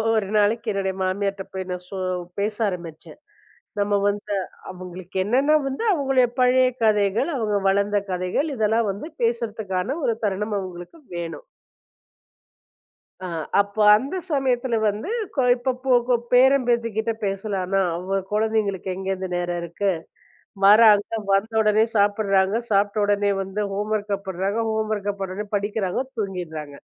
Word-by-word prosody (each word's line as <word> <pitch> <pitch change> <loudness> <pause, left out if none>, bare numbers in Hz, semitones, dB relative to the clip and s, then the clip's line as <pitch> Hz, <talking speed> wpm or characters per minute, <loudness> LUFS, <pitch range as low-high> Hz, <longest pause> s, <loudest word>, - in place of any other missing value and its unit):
ஒரு 215 -3 0
நாளைக்கு 220 +3 +2
என்னோட 195 -1 -1
மாமியார்ட்ட 195 +1 -1
போய் 190 0 -4 0.2
சோ 195 - -6 0.4
பேச 210 +1 -1
ஆரம்பிச்சேன். 170 - -7 0.6
நம்ம 205 0 +1 0.2
வந்து 205 0 -3 0.4
அவங்களுக்கு 185 0 -10
என்னன்னா 270 +8 +3
வந்து 270 +9 -3
அவங்க 270 -5 +3 0.2
பழைய 255 +1 +5 0.2
கதைகள், 210 - +2
அவங்க 210 -3 0
வளர்ந்த 200 +1 +2
கதைகள் 185 - -1
இதெல்லாம் 220 -1 +1
வந்து 205 +11 -7
பேசறதுக்கான 225 - -1
ஒரு 230 - +2
தருணம் 210 +1 -1
அவங்களுக்கு 185 - -8 0.2
வேணும். 170 - -5 1.8
அ - - -3 0.3
அப்போ 200 +1 0
அந்தச் 285 - -3
சமயத்துல 255 -4 +1
வந்து, 210 - -2 0.3
கொ 265 - +2
இப்பப்போ 255 +1 -2 0.2
கொ 250 - +5 0.2
பேரன், 260 +1 +5
பேத்தி 235 -1 +2
கிட்ட 220 +1 +1
பேசலாம்ன. 195 -1 -1 0.2
அவ 190 +2 -2
குழந்தைகளுக்கு 210 -3 0
எங்க 190 0 -6
இருந்து 190 -1 -3
நேரம் 175 0 -2
இருக்கு. 180 +4 -1 0.7
வராங்க. 210 0 +7 0.2
வந்தவுடனே 215 +1 +3
சாப்பிடுறாங்க. 200 0 +2
சாப்பிட்ட 205 +1 +2
உடனே 205 0 +2
வந்து 195 +2 -3
ஹோம் 210 +2 -3
வொர்க் 205 -1 -1
பண்ணுறாங்க. 190 +4 -1
ஹோம் 220 0 -1
வொர்க் 205 -1 -3
பண்ணவோண்னே 195 +2 -4
படிக்கிறாங்க. 205 0 -1 0.2
தூங்கிடுறாங்க. 160 -8 -5
205 Hz, 130 wpm, -23 LUFS, 190-225 Hz, 1.8 s, வராங்க